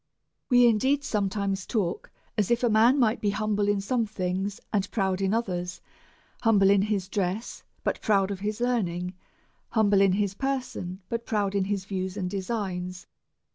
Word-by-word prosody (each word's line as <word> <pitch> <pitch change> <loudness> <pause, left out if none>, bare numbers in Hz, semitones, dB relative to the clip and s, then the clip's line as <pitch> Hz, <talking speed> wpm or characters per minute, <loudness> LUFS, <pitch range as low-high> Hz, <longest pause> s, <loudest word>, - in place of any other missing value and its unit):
We 245 -1 +6
indeed 260 +5 +3
sometimes 200 -4 -1
talk 195 -7 -2 0.3
as 210 -3 +1
if 240 +1 +2
a 240 - +4
man 230 +5 +5
might 235 -3 +2
be 205 - +1
humble 210 0 0
in 205 -1 +2
some 230 +3 0
things, 190 0 -2
and 200 -1 +1
proud 190 -3 0
in 195 0 +1
others, 180 -6 -2 0.6
humble 205 -4 +5
in 200 -1 +5
his 200 -2 -1
dress, 195 +3 -2 0.2
but - - -1
proud 200 -2 +2
of 195 - -4
his 210 +2 -3
learning, 180 -8 -1 0.6
humble 205 -3 +3
in 195 -2 +4
his 200 -1 0
person, 205 -7 -3
but 230 +2 -4
proud 205 -3 0
in 200 -1 +1
his 200 -1 -2
views 190 0 -3
and 180 -2 -2
designs. 185 -3 -3
200 Hz, 170 wpm, -27 LUFS, 190-220 Hz, 0.6 s, We